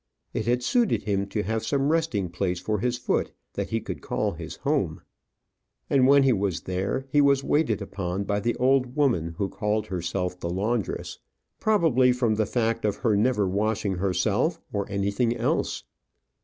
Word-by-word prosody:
It 110 - -2
had 125 +1 +1
suited 235 - +2
him 100 -2 0
to 105 +1 -2
have 110 +2 -2
some 140 +1 +1
resting 140 - 0
place 90 0 -2
for 105 +3 -1
his 120 +3 0
foot, - - -1 0.2
that - - -3
he - - 0
could - - -6
call - - -1
his - - -7
home; - - -1 0.9
and 130 -2 +5
when 140 0 +6
he 135 -2 +4
was 100 -4 -1
there, 95 +8 -2
he 145 - +5
was 140 -1 +4
waited 140 -11 +1
upon 95 -1 -3
by 100 0 -1
the 115 +3 0
old 130 0 +2
woman 105 - +1
who 100 - 0
called 105 +2 -1
herself 90 -1 -3
the 85 - -3
laundress 105 +5 -2 0.4
probably 160 - +3
from 125 -3 +1
the 110 -1 0
fact 115 -2 0
of 105 -2 +1
her 110 -1 +1
never 105 -1 +2
washing 105 0 0
herself 100 - +1
or 100 -1 -2
anything 100 +5 0
else. 115 - -1
110 Hz, 175 wpm, -26 LUFS, 100-130 Hz, 0.9 s, when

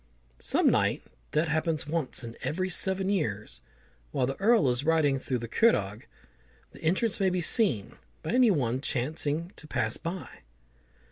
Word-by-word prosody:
Some - - +2
night - - +2 0.3
that 155 +3 0
happens 160 0 -1
once 150 -5 -1
in 115 0 -8
every 185 +4 -2
seven 190 +2 +1
years, 150 - -2 0.5
while 125 - 0
the 135 +2 -3
Earl 215 - +4
is 125 +2 -1
riding 155 -3 +2
round 125 -2 -3
the 115 - -5
Curragh, 110 - +1 0.6
the - - -14
entrance 190 +7 0
may 195 -1 +3
be 180 0 -1
seen 165 - +3 0.3
by - - -3
any 250 0 +5
one 130 - 0
chancing 150 +5 -2
to 155 - -11
pass 115 -5 -1
by. 170 -4 -7
155 Hz, 155 wpm, -28 LUFS, 125-185 Hz, 0.6 s, any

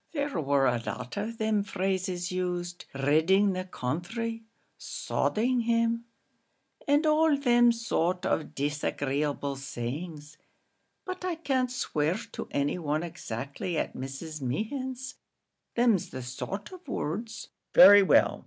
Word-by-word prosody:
"There 285 - -1
war 140 -1 +2
a 120 -2 +2
lot 125 0 -5
of 215 +3 -3
thim 220 -2 +1
phrases 185 -2 -2
used 180 -1 -3
ridding 160 +9 +3
the 185 0 -3
counthry 190 - -3 0.4
sodding 245 +3 0
him 230 0 +1 0.8
and 290 +2 +4
all 305 -1 +4
thim 240 -3 +5
sort 185 -6 -1
of 155 - -1
disagreeable 145 0 -1
sayings; 150 +4 -6 0.7
but 370 -1 -5
I 365 -2 -1
can't 270 -5 0
swear 160 -9 0 0.2
to - - -6
any 145 +5 0
one 155 0 -1
exactly 155 0 -5
at - - -1
Mrs. 135 +4 -6
Mehan's 255 - -3 0.6
thim's 235 -6 +3
the 130 - -6
sort 190 - -5
of 365 -4 -12
words." 220 - -4 0.3
"Very 205 -6 +10
well. 195 - +4
185 Hz, 125 wpm, -28 LUFS, 150-235 Hz, 0.8 s, Very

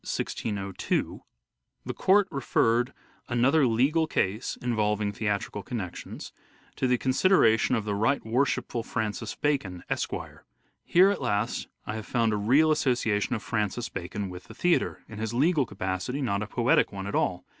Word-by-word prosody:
(1602) 100 -4 -2 0.3
" - - -52
The - - -3
Court 195 +1 +4
referred 120 -3 +1 0.4
(another 130 +4 +3
legal 140 +8 +2
case 105 -5 -1
involving 105 -3 0
theatrical 105 -1 -2
connections) 100 -4 -6 0.5
to 130 - +1
the 125 0 +3
consideration 130 - +3
of 110 -3 -2
the 105 - -1
right 110 +7 +1
worshipful 120 0 0
Francis 110 -1 -3
Bacon, 130 -12 -1
Esq - - 0 0.7
Here 185 +3 +5
at 200 - -3
last 115 -1 -1 0.2
I 105 - -4
have 110 - -7
found 115 -3 +1
a - - +1
real 135 +10 +4
association 120 -7 +1
of 110 - -5
Francis 110 +2 -2
Bacon 95 +3 -5
with 90 0 -9
the - - -12
Theatre.... 175 -1 +1
in 105 - -9
his 110 +1 -3
legal 145 0 +3
capacity, 95 +6 -3
not 100 -5 0
a 105 - -3
poetic 120 +2 +2
one 95 -1 -6
at 100 - -5
all. 90 0 0
115 Hz, 155 wpm, -27 LUFS, 105-130 Hz, 0.7 s, Here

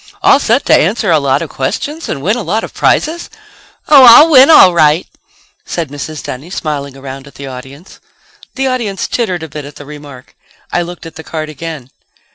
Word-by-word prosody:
"All - - +5
set - - 0
to - - +4
answer - - +1
a - - +3
lot - - 0
of - - -9
questions 310 +3 -4
and 140 - -5
win 210 +5 +1
a 245 - -4
lot 210 +5 -2
of - - -8
prizes?" 335 +2 -1 0.6
"Oh, 280 -3 +7
I'll 275 +7 +8
win 270 0 +7
all 190 - +7
right," 155 0 +2 0.6
said 165 -4 -5
Mrs. 145 +1 -7
Dunny, 135 +7 -8
smiling 145 -6 -5
around 135 0 -9
at 140 - -17
the 140 - -9
audience. 135 +6 -11 0.6
The 270 +1 -2
audience 235 -7 -3
tittered 185 -8 -3
a - - -6
bit 150 0 -8
at 145 +1 -12
the 145 - -12
remark. 145 -3 -13 0.4
I 175 - +1
looked 175 0 -8
at 165 - -11
the 160 - -9
card 155 0 -6
again. 155 -4 -8
160 Hz, 200 wpm, -13 LUFS, 140-220 Hz, 0.6 s, I'll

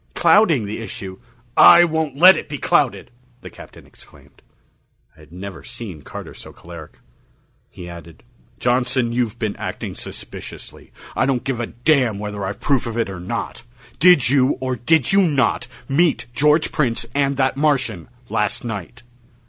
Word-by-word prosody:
"Clouding 165 - +4
the 105 +3 -5
issue...." 95 -4 -8 0.4
"I 175 0 +8
won't 160 -4 -1
let 185 +5 +8
it - - -6
be 145 - -4
clouded," 130 -4 0 0.3
the - - -10
Captain - - -14
exclaimed. - - -18 0.7
I - - -24
had 75 -1 -18
never 95 +2 -9
seen 95 -10 -8
Carter - - -9
so - - -11
choleric. 85 -2 -12 0.7
He 90 - -11
added: 85 -2 -12 0.3
"Johnson, 125 -1 0
you've 120 -2 -1
been 110 -3 -3
acting - - -5
suspiciously. - - -10 0.2
I - - +1
don't 130 -3 0
give 135 -4 -3
a 120 - -3
damn 120 -3 +1
whether 105 -1 -5
I've 95 +1 -5
proof 135 -4 0
of 115 0 -5
it 115 -4 -1
or 90 - -7
not. 115 +6 -5 0.4
Did 165 -7 +6
you 135 +1 +2
or 130 0 -2
did 130 +3 +2
you 200 +1 +5
not 135 -8 +1 0.2
meet 155 +4 +1
George 150 +5 +2
Prince 125 -7 -1
and 140 -1 0
that 130 -1 +1
Martian, 130 - -1 0.2
last 105 -3 -1
night?" 115 +2 -7
120 Hz, 160 wpm, -20 LUFS, 105-145 Hz, 0.7 s, I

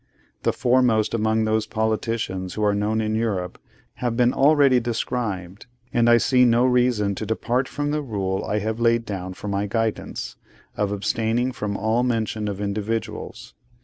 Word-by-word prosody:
The - - +2
foremost 120 -3 +2
among 110 0 +1
those 110 0 0
politicians 110 -5 -2
who 110 - -2
are 105 -1 +3
known 105 +2 0
in 110 0 -1
Europe, 100 -5 -2 0.4
have 120 -2 -2
been 125 0 +3
already 140 -2 +5
described, 115 -5 -3 0.3
and 120 0 +3
I 120 - +7
see 125 +2 +3
no 120 0 +4
reason 125 -5 +2
to 100 - -5
depart 120 +4 -1
from 145 0 -3
the 150 0 0
rule 100 -7 -2
I 105 - -1
have 110 +2 -2
laid 115 0 +2
down 95 -3 -5
for 105 - -8
my 100 0 -1
guidance, 115 +1 -3 0.4
of 105 -1 -1
abstaining 115 +4 0
from 105 -4 -3
all 110 +3 +1
mention 110 -3 -1
of 100 -1 -4
individuals. 105 +2 -4
110 Hz, 165 wpm, -23 LUFS, 105-120 Hz, 0.4 s, I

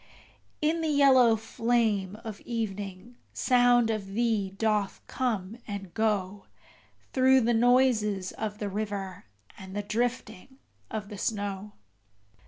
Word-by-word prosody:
In 325 +2 +1
the 320 - -1
yellow 265 -6 +5
flame 220 -3 0
of 215 -3 -7
evening 210 0 -5 0.2
sound 245 -2 +3
of 200 -3 -5
thee 225 -4 +1
doth 210 0 -1
come 225 -4 -3
and 200 -4 -6
go 205 -3 -1 0.7
Through 260 0 +5
the 235 +1 +2
noises 225 -5 +2
of 210 -1 -5
the 210 - -3
river, 200 -2 -4 0.3
and 190 0 -9
the 205 - -2
drifting 235 +2 -3 0.3
of 210 -2 -5
the 205 -3 -8
snow. 205 -1 -3
215 Hz, 120 wpm, -28 LUFS, 200-240 Hz, 0.7 s, yellow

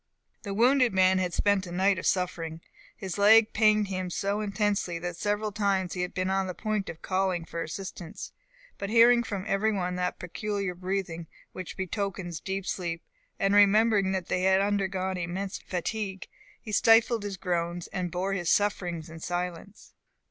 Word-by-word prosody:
The 200 -3 -5
wounded 250 +1 +4
man 185 0 +4
had 180 -1 -1
spent 200 +1 +1
a - - -8
night 190 +1 +2
of - - -2
suffering. 165 -3 -1 0.4
His 190 +1 -5
leg 220 +2 +6
pained 215 -2 +3
him 185 -1 -3
so 200 +4 -1
intensely, 205 -4 -1
that 175 +1 -5
several 205 +4 -1
times 195 -3 0
he 180 - -3
had 180 - -4
been 185 0 0
on 190 0 0
the 180 - -5
point 215 -3 -2
of 160 - -9
calling 185 -3 0
for 170 - -5
assistance; 170 +1 -7 0.5
but 200 - -3
hearing 235 +2 +6
from 200 -5 -4
every 215 +2 +1
one 180 -3 -2
that 180 0 -1
peculiar 200 +1 -3
breathing 180 -2 -4 0.2
which 185 -2 -8
betokens 190 -3 -3
deep 190 +2 -4
sleep, 170 -4 -3 0.3
and 195 0 +1
remembering 205 -1 +5
that 190 -2 -2
they 180 - 0
had 190 +1 +4
undergone 195 -2 0
immense 185 +3 -4
fatigue, 190 +1 -4 0.3
he 215 - -9
stifled 225 +2 +4
his 200 -2 -5
groans, 175 -1 -2
and 180 -2 -2
bore 185 +3 -2
his 175 -4 -1
sufferings 180 -5 0
in 160 0 -10
silence. 175 +3 -5
190 Hz, 170 wpm, -28 LUFS, 180-205 Hz, 0.5 s, leg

